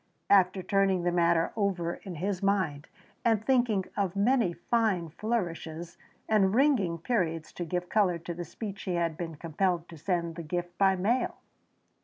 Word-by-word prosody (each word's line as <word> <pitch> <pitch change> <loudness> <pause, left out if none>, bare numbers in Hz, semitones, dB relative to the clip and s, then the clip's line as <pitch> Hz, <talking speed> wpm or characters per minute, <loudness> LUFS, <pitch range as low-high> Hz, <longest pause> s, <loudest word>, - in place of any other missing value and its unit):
After 190 -1 +4
turning 195 -2 +2
the 175 - +1
matter 170 -1 +2
over 185 -5 -1
in 185 -4 -7
his 185 +3 -2
mind 185 -8 0 0.4
and 220 -2 +2
thinking 240 -7 +2
of 195 -2 -1
many 225 -1 +3
fine 190 -2 0
flourishes 170 -4 -3 0.3
and 205 -2 +3
ringing 240 - +3
periods 165 -5 -1
to 175 - -4
give 180 +2 -2
colour 190 -5 +2
to 170 +1 -6
the 175 +1 -5
speech 195 +4 -7
he 180 - -2
had 170 -2 0
been 165 -1 -5
compelled 170 +2 -1
to 165 - -10
send 170 -1 -1
the - - -4
gift 175 +2 -4
by 195 -1 +5
mail. 215 +8 0
180 Hz, 165 wpm, -29 LUFS, 170-200 Hz, 0.4 s, by